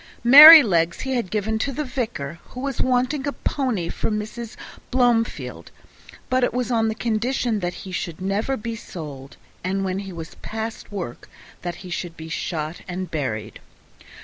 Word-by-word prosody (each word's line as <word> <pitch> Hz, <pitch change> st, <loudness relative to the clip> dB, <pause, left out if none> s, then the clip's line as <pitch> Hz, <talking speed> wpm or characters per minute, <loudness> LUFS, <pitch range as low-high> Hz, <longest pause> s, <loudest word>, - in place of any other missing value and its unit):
Merrylegs 245 Hz, -, +9 dB
he 265 Hz, 0 st, -2 dB
had 235 Hz, -7 st, -1 dB
given 220 Hz, +2 st, -1 dB
to 275 Hz, -, -1 dB
the 300 Hz, +3 st, -3 dB
vicar, 220 Hz, -, -4 dB
who 250 Hz, -, -10 dB
was 270 Hz, -1 st, -2 dB
wanting 255 Hz, +3 st, 0 dB
a -, -, 0 dB
pony 250 Hz, -13 st, -2 dB
for -, -, -3 dB
Mrs. 220 Hz, +2 st, -5 dB, 0.3 s
Blomefield, 240 Hz, -3 st, 0 dB, 0.6 s
but 255 Hz, 0 st, +1 dB
it 245 Hz, -, 0 dB
was 250 Hz, 0 st, -1 dB
on 225 Hz, -2 st, +2 dB
the 220 Hz, -, -2 dB
condition 230 Hz, 0 st, -1 dB
that 175 Hz, -2 st, -3 dB
he 190 Hz, -, -7 dB
should 170 Hz, -2 st, -4 dB
never 205 Hz, +8 st, -1 dB
be 230 Hz, +1 st, -5 dB
sold, 145 Hz, -10 st, -9 dB, 0.3 s
and 190 Hz, +2 st, -1 dB
that -, -, -2 dB
when 190 Hz, 0 st, -2 dB
he 195 Hz, -1 st, -7 dB
was 165 Hz, -2 st, -8 dB
past 220 Hz, 0 st, -6 dB
work 180 Hz, -12 st, -6 dB, 0.5 s
he 180 Hz, 0 st, -10 dB
should 170 Hz, -1 st, -5 dB
be 160 Hz, 0 st, -8 dB
shot 160 Hz, -1 st, -4 dB
and 180 Hz, 0 st, -5 dB
buried. 110 Hz, -8 st, -4 dB
215 Hz, 170 wpm, -23 LUFS, 175-245 Hz, 0.6 s, Merrylegs